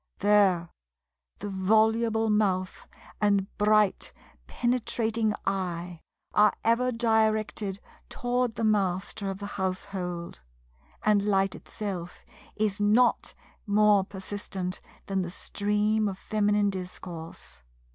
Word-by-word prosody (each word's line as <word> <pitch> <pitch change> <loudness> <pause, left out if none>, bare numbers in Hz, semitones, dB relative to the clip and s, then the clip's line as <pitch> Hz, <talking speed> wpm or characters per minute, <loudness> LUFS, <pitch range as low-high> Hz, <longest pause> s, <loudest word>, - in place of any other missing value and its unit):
There 195 -5 +3 0.7
the 205 0 -5
voluble 220 +3 +2
mouth 190 -3 0 0.3
and 200 -1 +1
bright 210 -1 +3 0.4
penetrating 230 -3 0
eye 180 -3 -3 0.3
are 210 0 +5
ever 240 +3 +2
directed 220 -3 0 0.3
toward 245 -1 -1
the - - -3
Master 200 -1 0
of 195 - -4
the 200 - -7 0.2
household; 185 - -4 0.6
and 210 -1 +4
light 195 -2 +2
itself 185 -5 -6 0.3
is 210 -2 0
not 225 +4 +3 0.3
more 205 -1 +4
persistent 190 -1 -6 0.2
than 195 -1 -1
the 175 - -3
stream 210 +3 0
of 195 -2 -4
Feminine 205 0 +1
discourse. 170 - -8
205 Hz, 100 wpm, -28 LUFS, 190-215 Hz, 0.7 s, are